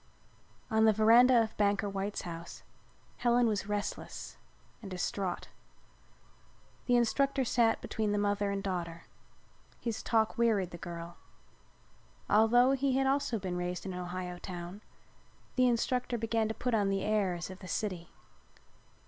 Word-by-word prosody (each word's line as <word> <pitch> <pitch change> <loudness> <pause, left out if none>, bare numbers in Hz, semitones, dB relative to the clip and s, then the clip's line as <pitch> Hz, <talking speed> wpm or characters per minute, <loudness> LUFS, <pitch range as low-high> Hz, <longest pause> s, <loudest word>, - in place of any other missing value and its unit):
On 220 0 +4
the 220 - +6
veranda 230 +3 +6
of 220 - -6
Banker 205 0 +2
White's 200 +1 -3
house 170 -1 -8 0.5
Helen 240 0 +3
was 210 -3 0
restless 205 0 -4 0.5
and 205 - -8
distraught. 185 0 -3 1.4
The 245 - +4
instructor 270 +3 +2
sat 230 -1 +2
between 215 -2 -2
the 205 - +1
mother 205 0 +1
and 200 0 -2
daughter. 170 -3 -4 0.8
His 230 -2 -3
talk 220 0 +1
wearied 210 -6 +2
the 170 - -9
girl. 170 0 -7 1.1
Although 240 +4 +5
he 270 -1 +1
had 270 - +2
also 270 -3 +1
been 185 -3 -4
raised 180 +1 -3
in 190 - -4
an 180 - -5
Ohio 180 0 -5
town, 175 +2 -7 0.7
the 255 -1 +4
instructor 245 +1 0
began 225 -1 0
to 220 - -4
put 250 -1 -2
on 205 -3 +2
the 195 -1 0
airs 190 -4 0
of 185 - -10
the 185 - -10
city. 180 -2 -3
205 Hz, 145 wpm, -31 LUFS, 185-235 Hz, 1.4 s, the